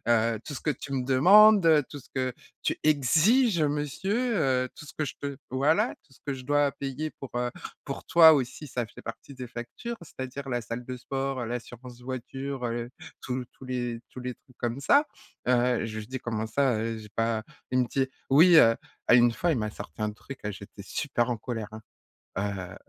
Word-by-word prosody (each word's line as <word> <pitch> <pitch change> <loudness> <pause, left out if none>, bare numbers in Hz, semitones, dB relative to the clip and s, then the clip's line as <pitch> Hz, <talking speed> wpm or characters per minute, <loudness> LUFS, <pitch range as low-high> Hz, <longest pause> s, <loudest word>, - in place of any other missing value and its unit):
heu, 115 -1 +3
tout 145 - -6
ce - - -6
que 155 - 0
tu 140 +1 -5
me 130 -2 -1
demandes, 195 +9 +7
heu, 155 -4 +5
tout 145 - -8
ce - - -20
que 130 -1 -1 0.3
tu - - +1
exiges 165 - +4
monsieur, 190 - 0
heu, 130 -5 +2
tout - - -11
ce - - -11
que 155 - +1
je - - -5
te 140 -1 -4
voilà, 140 +5 +2
tout 135 - -26
ce - - -20
que 140 - -1
je 130 - -8
dois 145 +1 +2
payer 140 +3 -4
pour, 135 - -7
heu, 120 0 -1 0.3
pour 140 - -5
toi 165 -3 +8
aussi, 140 +2 -1
ça 125 -2 -2
fait 110 - -13
partie 115 +4 -8
des 125 -1 -7
factures, 120 - -6
c'est-à-dire 135 -2 -7
la 120 -1 -1
salle 115 +2 -6
de 130 0 -5
sport, 135 -1 -3
l'assurance 120 +1 -7
voiture, 130 +1 -5
heu, 120 +1 -3 0.3
tous 125 0 -3
tous - - -14
les 120 -2 -3
tous - - -11
les 125 0 -4
trucs 125 - -26
comme 120 +2 -2
ça, 285 - +4 0.4
heu, 125 -1 +3
j'ai - - -2
juste 110 +1 -6
dit: 130 - -3
«Comment 110 -2 -3
ça, 135 +1 +2
heu, 115 0 -2
j'ai 105 -2 -11
pas?» 115 -1 0 0.3
il 130 - +2
me 125 - +1
dit: 135 +2 0 0.2
«Oui, 165 +5 +7
heu». 115 -6 +8 0.3
Ah, - - +7
une 120 0 +7
fois, 175 +6 +1
il - - 0
m'a 110 -1 -2
sorti 95 0 -8
un 105 - 0
truc, 130 +5 -10
j'étais 100 0 -10
super 120 +1 -1
en 120 - 0
colère, 115 -1 -5
hein, 110 - -9 0.9
heu, 95 - -10
130 Hz, 210 wpm, -28 LUFS, 120-145 Hz, 0.9 s, toi